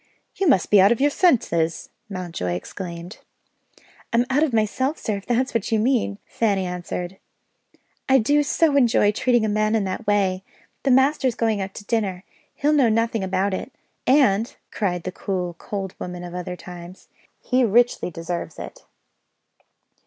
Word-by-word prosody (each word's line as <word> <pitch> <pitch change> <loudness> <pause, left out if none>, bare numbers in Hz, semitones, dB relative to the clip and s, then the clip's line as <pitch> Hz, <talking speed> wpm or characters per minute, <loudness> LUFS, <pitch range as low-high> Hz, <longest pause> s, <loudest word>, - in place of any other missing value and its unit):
"You 390 - -1
must 190 - +3
be 205 -2 +7
out 200 +3 +6
of 235 - +1
your 290 +2 +3
senses!" 170 - +1 0.2
Mountjoy 175 - -4
exclaimed. 170 - -7 0.9
"I'm 235 +1 +3
out 280 +3 +3
of 310 -3 +2
myself 235 +6 0
sir, 210 -2 -2
if 200 - -11
that's 250 +2 0
what 230 -2 -1
you 220 - +3
mean," 220 -3 +1
Fanny 200 -4 0
answered. 180 +1 -5 0.9
"I 265 - +6
do 285 +5 +3
so 295 +1 +2
enjoy 235 -6 +4
treating 240 +1 +2
a - - 0
man 215 +1 +1
in 215 - +1
that 190 +3 -4
way! 190 -2 +1 0.4
The 275 - 0
master's 265 -1 +3
going 220 -3 0
out 195 0 -5
to 205 - -9
dinner 195 -5 -1 0.3
he'll 295 +2 +1
know 270 -6 +4
nothing 225 -1 0
about 190 +1 0
it 230 - -4 0.4
and," 235 -5 +3 0.2
cried 180 -5 -2
the 185 - -4
cool 180 -2 -3
cold 195 -2 -5
woman 180 0 -6
of 175 0 -8
other 180 0 -5
times, 180 0 -11 0.3
"he 255 0 +1
richly 240 -2 +2
deserves 165 -1 -5
it." - - -9
210 Hz, 165 wpm, -23 LUFS, 185-245 Hz, 0.9 s, be